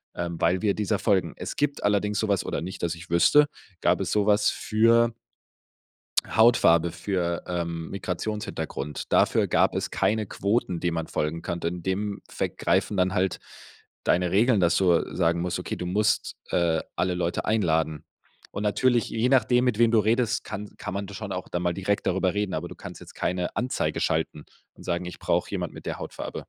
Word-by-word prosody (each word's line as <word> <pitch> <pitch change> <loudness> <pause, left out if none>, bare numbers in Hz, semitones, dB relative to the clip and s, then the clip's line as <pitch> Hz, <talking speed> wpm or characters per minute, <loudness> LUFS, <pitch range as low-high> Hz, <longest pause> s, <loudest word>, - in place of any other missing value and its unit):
ähm, 85 -1 -4
weil 95 +2 +2
wir 100 -2 +1
dieser 105 -1 0
folgen.” 95 -2 +1
Es - - -5
gibt 145 0 -1
allerdings 105 0 +1
so 110 - 0
was 100 - +1
oder - - -2
nicht, 95 +1 -7
dass 85 0 0
ich 85 0 -12
wüsste 145 - +5 0.3
gab 90 +2 +3
es 95 - -2
so 105 -1 +2
was 105 0 +4
für 115 +1 +3 1.1
Hautfarbe, 85 -8 +4
für, 85 -1 -2
ähm, 85 -2 -3
Migrationshintergrund. 95 -7 -4
Dafür - - +3
gab - - +2
es - - -2
keine 110 0 +1
Quoten, 100 -3 -1
denen 85 -1 -1
man 80 -1 -3
folgen 80 +2 -2
kann. 85 - -3
In 85 0 -3
dem 100 +2 -2
Effekt - - -3
greifen 100 - +1
dann 95 +1 +2
halt 95 -2 0 0.6
deine 90 0 +2
Regeln, 110 +1 +4
dass 85 -1 +3
du 90 -3 +2
sagen 85 -1 +2
musst, 90 0 -2
okay, - - -4
du 90 - -5
musst, 105 +4 +1
äh, 85 -2 +1
alle 90 0 0
Leute 85 -1 -1
einladen. 80 -8 +1 0.5
Und 105 - -4
natürlich, 120 +3 +2
je 115 +3 0
nachdem, 125 -1 +4
mit 120 -4 +1
wem 115 -1 +5
du 115 - +5
redest, 115 +1 +1
kann 105 -1 -6
kann 105 - -5
man 100 0 -3
da 100 - -10
schon 100 -1 -6
auch 90 - -5
da 90 - -2
mal 90 -1 0
direkt 100 +2 -1
darüber 95 0 +1
reden, 105 -2 -1
aber - - -3
du - - -9
kannst - - -10
jetzt - - -12
keine 90 0 -2
Anzeige 125 +2 -1
schalten 80 -1 -1 0.3
und - - -14
sagen: 85 +1 -1
„Ich 90 - -8
brauche - - 0
jemand - - -3
mit - - -11
der - - -4
Hautfarbe.” - - -6
95 Hz, 195 wpm, -26 LUFS, 85-105 Hz, 1.1 s, wüsste